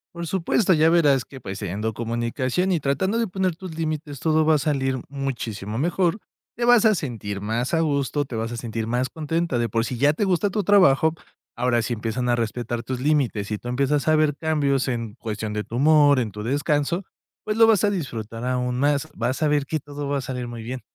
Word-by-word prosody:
Por 170 0 -5
supuesto, 190 +3 +2
ya 160 0 +4
verás 145 -6 +4
que, 135 - -12
pues, 100 -4 -6
teniendo 105 +3 -3
comunicación 120 - -1
y 165 - 0
tratando 165 - 0
de 230 -1 +1
poner 185 -2 -1
tus 175 -2 -9
límites, 155 -3 -3
todo 160 -1 +2
va 160 0 +5
a - - +4
salir 135 -3 0
muchísimo 120 -7 -4
mejor. 175 - +1 0.4
Te 240 - 0
vas 245 -2 +6
a 220 -2 +5
sentir 110 - -4
más 115 - -2
a 165 - +3
gusto, 145 -2 0
te 125 - -7
vas 115 +1 -3
a 120 - -5
sentir 115 -1 -4
más 125 +2 0
contenta, 160 -2 -2
de 120 -1 0
por 115 +2 0
si, 125 - -4
ya 145 +4 +4
te 180 +7 -1
gusta 190 +2 +1
tu 205 -1 -2
trabajo, 160 -6 +5 0.4
ahora, 120 -1 +1
si 115 +2 -2
empiezan 115 +2 -2
a 120 - +3
respetar 120 +1 -3
tus 125 +1 -4
límites, 130 -8 0
y 105 - -1
tú 120 - -7
empiezas 140 +3 +1
a 155 - +5
ver 155 -2 +2
cambios 140 -4 0
en 115 -4 -3
cuestión 110 -3 -4
de 105 0 -2
tu 115 - -6
humor, 145 0 +5
en 115 -4 -2
tu 105 +1 -7
descanso, 145 - 0 0.4
pues, 215 0 -1
lo 225 0 +7
vas 220 -2 +4
a - - +3
disfrutar 115 - -4
aún 125 -1 -1
más, 145 0 +1
vas 130 +5 -2
a 155 - +4
ver 145 -1 +1
que 155 +3 -2
todo 145 0 -6
va 145 - 0
a - - -2
salir 125 -1 -4
muy 120 -1 -7
bien. 125 +3 -5
140 Hz, 225 wpm, -23 LUFS, 120-160 Hz, 0.4 s, lo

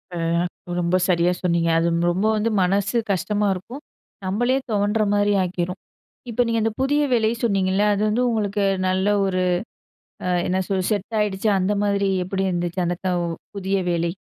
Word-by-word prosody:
ஆ - - -3 0.6
ரொம்ப 175 +1 +1
சரியா 175 -1 +3
சொன்னீங்க. 170 -1 +1
அது 165 - +1 0.2
ரொம்ப 190 +4 -1
வந்து 215 +2 0
மனசு 200 +4 +1
கஷ்டமா 205 +2 0
இருக்கும். 220 +10 -8 0.4
நம்மளே 240 +7 +1
துவண்ட்றமாரி 205 0 +2
ஆக்கிரும். 180 0 -3 0.5
இப்ப 235 +1 +1
நீங்க 230 0 +1
அந்த 225 - +1
புதிய 290 +2 +2
வேலை 220 -2 +3
சொன்னீங்கல்ல. 195 -2 +2
அது 200 - -1
வந்து 235 +4 +1
உங்களுக்கு 205 -3 0 0.2
நல்ல 190 +1 +1 0.2
ஒரு 185 -1 0 0.9
அ - - 0 0.2
என்ன 185 - 0
சொல்ல 190 -2 0
செட் 210 +1 -2
ஆயிடுச்சா 210 0 0
அந்த 185 +3 +1
மாதிரி 200 -1 +1 0.2
எப்பிடி 190 +1 -2
இருந்துச்சு, 175 +1 -2
அந்த 175 +1 -1
தவ் 180 -2 0 0.3
புதிய 195 0 0
வேலை? 170 0 0
195 Hz, 155 wpm, -22 LUFS, 180-210 Hz, 0.9 s, சரியா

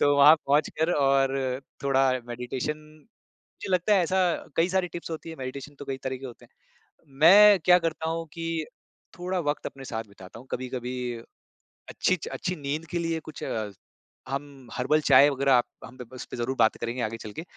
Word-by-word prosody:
तो 145 0 +4
वहाँ 145 +2 +9
पहुँच 145 +2 +3
कर 165 +2 +2
और 135 -2 +1 0.2
थोड़ा 135 -1 +3 0.2
मेडिटेशन 125 +5 -4 0.6
मुझे 190 - -9
लगता 185 +4 +3
है 190 - +4
ऐसा 185 +2 +1 0.3
कई 165 +2 +3
सारी 185 -1 0
टिप्स 170 -1 -8
होती 165 0 -6
है, 160 - -8
मेडिटेशन 135 +2 -7
तो 145 - -7
कई 135 -1 -4
तरह 130 0 -2
के 135 +1 -8
होते 120 - -12 0.4
हैं। 140 - -31
मैं 200 +5 +8
क्या 180 0 +7
करता 160 -1 -2
हूँ 165 0 -3
कि 165 -2 -3 0.5
थोड़ा 180 +1 -2
वक़्त 145 -2 -2
अपने 135 0 -7
साथ 115 -2 -4
बिताता 100 +2 -13
हूँ 130 - -15
कभी-कभी 125 0 -4 1.0
अच्छी 185 -1 +1
अच्छी 180 0 -3
नींद 150 +3 -4
के 175 - -1
लिए 165 -1 -1
कुछ - - -8 0.8
हम 135 -2 -6
हर्बल 150 +5 +1
चाय 145 -1 +6
वगैरह 135 0 +1
आप 120 -1 +4 0.2
हम 130 +3 -12 0.2
उसपे 125 - -8
ज़रूर 125 +3 -2
बात 110 -1 +3
करेंगे 120 +1 -3
आगे 110 +1 -2
चल 110 -2 -9
के, 160 - -6
145 Hz, 185 wpm, -26 LUFS, 130-165 Hz, 1.0 s, वहाँ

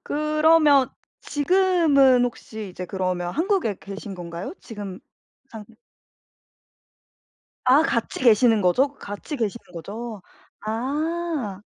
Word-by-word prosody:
그러면 305 -2 +3 0.3
지금은 290 -6 +3
혹시 220 -3 -6
이제 180 0 -7
그러면 180 -2 -2
한국에 330 - 0
계신 195 0 -8
건가요? 175 - -7
지금 205 -5 -8 0.5
사는 220 -2 -9 2.0
아. 270 +5 +6
같이 230 -7 -1
계시는 225 -2 +5
거죠? 265 +11 +2
같이 205 +6 -7
계시는 225 -5 -4
거죠? 205 +5 -7 0.4
아. 275 - -3
240 Hz, 210 characters per minute, -23 LUFS, 200-300 Hz, 2.0 s, 아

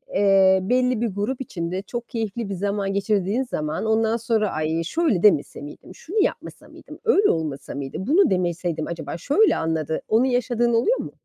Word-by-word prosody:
Eee, 195 -1 +5
belli 250 +2 +1
bir 235 - +1
grup 215 +7 -3
içinde 180 -4 -4
çok 240 +4 -7
keyifli 225 -2 -4
bir - - -3
zaman 200 +1 -2
geçirdiğin 200 +4 0
zaman 155 -6 -3
ondan 220 +1 +1
sonra 220 -3 0
ay 160 +2 -1
şöyle 280 - 0
demese 160 -10 +3
miydim? 145 +5 -11
Şunu 405 +6 -4
yapmasa - - -4
mıydım? - - -13
Öyle 420 -3 +4
olmasa 150 -5 -3
mıydı? 135 -1 -5
Bunu 305 - +3
demeseydim 175 -3 -1
acaba 170 0 -5
şöyle 345 - +3
anladı. 160 -1 -2
Onu 230 +4 +3
yaşadığın 240 -1 +1
oluyor 345 - +2
mu? - - -6
205 Hz, 170 wpm, -23 LUFS, 170-240 Hz, -, Eee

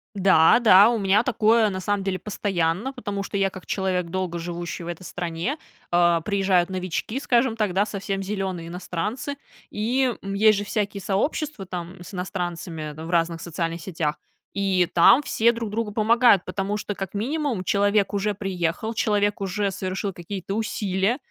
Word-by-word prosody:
Да, 190 +1 +5
да, 210 -2 +7
у 230 - 0
меня 200 +3 +3
такое, 225 -2 +3
на 185 - -4
самом 205 +1 -1
деле, 190 -1 -2
постоянно. 195 +3 -1
Потому 205 -6 -4
что 200 - -7
я 195 0 +2
как 190 -1 -11
человек, 185 -2 -1
долго 180 -1 -3
живущий 175 0 -5
в 170 - -8
этой 175 +1 -6
стране, 175 - -3 0.3
а, 175 -1 +4
приезжают 190 -1 +1
новички, 185 +6 -3
скажем 245 -3 +2
так, 210 -5 0
да, 200 +2 +2
совсем 195 -1 -3
зелёные 190 -4 -3
иностранцы, 190 - -4 0.4
и, 245 +4 +1
м, 195 0 -5
есть 215 0 +5
же 205 - -4
всякие 205 -1 -2
сообщества 220 +4 -1
там 180 0 -7
с 190 - -12
иностранцами 175 -4 -4
в 160 +2 -8
разных 165 -1 +1
социальных 170 0 -3
сетях, 160 -5 -2 0.4
и 195 -2 +2
там 215 +11 +6
все 235 -2 +3
друг 230 -3 -5
другу 220 -1 -2
помогают, 225 -1 +4
потому 200 +1 -2
что, 210 0 -4
как 195 0 -6
минимум, 255 -1 -1
человек 200 +1 +2
уже 205 0 0
приехал, 190 +2 -2
человек 205 -2 +1
уже 195 +1 -1
совершил 190 +1 -3
какие-то 185 +2 -6
усилия, 205 0 0
195 Hz, 165 wpm, -24 LUFS, 180-215 Hz, 0.4 s, да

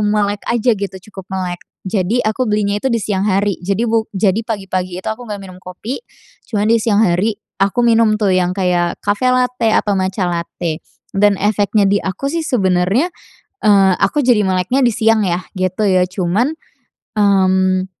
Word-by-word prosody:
melek 205 -1 0
aja 235 0 +2
gitu, 200 -2 -4 0.2
cukup 190 -1 -10
melek. 185 -2 -4 0.2
Jadi 200 +4 0
aku 220 +2 0
belinya 205 -1 0
itu 265 - 0
di 235 - +1
siang 200 -2 -2
hari. 200 0 0
Jadi 200 +5 0
bu 225 0 0
jadi 195 +2 +2
pagi-pagi 190 -5 -3
itu - - -2
aku 245 - -10
nggak 205 -1 -4
minum 190 -2 -10
kopi. 205 - -6 0.5
Cuman 210 -2 0
di 230 - +3
siang 210 -2 +2
hari 195 +4 +1 0.2
aku 200 +5 +2
minum 225 -2 +4
tuh, 205 -3 +1
yang 185 0 +1
kayak 180 -2 0
cafe 205 +5 +1
latte 250 -2 +1
atau 210 -1 +1
matcha 190 0 -1
latte 170 -1 -3 0.3
dan 200 0 +3
efeknya 205 +1 +1
di 200 +1 +2
aku 195 +9 -3
sih 335 - -1
sebenernya, 205 - +1 0.5
eee, 195 -2 +5
aku 295 - +2
jadi 245 -4 +4
meleknya 185 +9 +1
di 245 - +4
siang 225 -2 +3
ya, 180 0 -1
gitu 185 +3 -1
ya. 185 -1 +3
Cuman, 195 - 0 0.7
mmm, 190 -2 +3
200 Hz, 175 wpm, -17 LUFS, 185-220 Hz, 0.7 s, eee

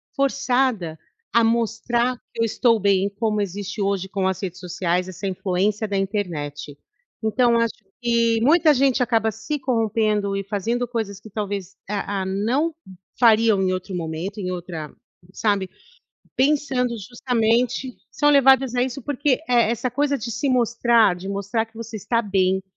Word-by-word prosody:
forçada 255 - 0 0.4
a 235 - +5
mostrar 235 +2 +1 0.2
que 230 - -3
eu - - +4
estou 230 0 +2
bem, 200 0 +2
como 215 -2 +1
existe 205 +2 -4
hoje 195 -1 0
com 195 -2 -1
as 190 - -1
redes 185 -2 -5
sociais, 180 0 -1
essa 185 +2 -5
influência 195 +3 -1
da 200 - -1
internet. 155 -8 -3 0.5
Então 235 +1 +3
acho 230 -1 +1 0.3
que 230 -1 +2
muita 310 +3 +5
gente 265 -1 +2
acaba 225 -2 +1
se 220 +8 -4
corrompendo 220 -5 0
e 195 - -2
fazendo 230 +5 -2
coisas 215 -4 -4
que 220 - -13
talvez, 200 -2 -4
ah 200 -1 -2
ah, - - -5
não 235 - 0 0.5
fariam 225 -4 +5
em 185 -1 +1
outro 185 0 -4
momento, 170 +5 -4
em 185 -1 -3
outra 170 -4 -6 0.4
sabe, 200 -3 0 0.7
pensando 265 -3 +1
justamente 240 +2 0 0.2
são 295 0 +2
levadas 270 -3 +5
a 245 - +3
isso, 260 +1 -4
porque 285 0 +1
e - - -13
essa 235 +1 +2
coisa 285 +2 +1
de 235 0 -5
se 230 +6 -2
mostrar, 235 -4 +3
de 185 +2 -8
mostrar 200 +3 -1
que 225 - -31
você 230 0 -7
está 230 +3 0
bem, 190 -2 +1
220 Hz, 160 wpm, -22 LUFS, 195-245 Hz, 0.7 s, a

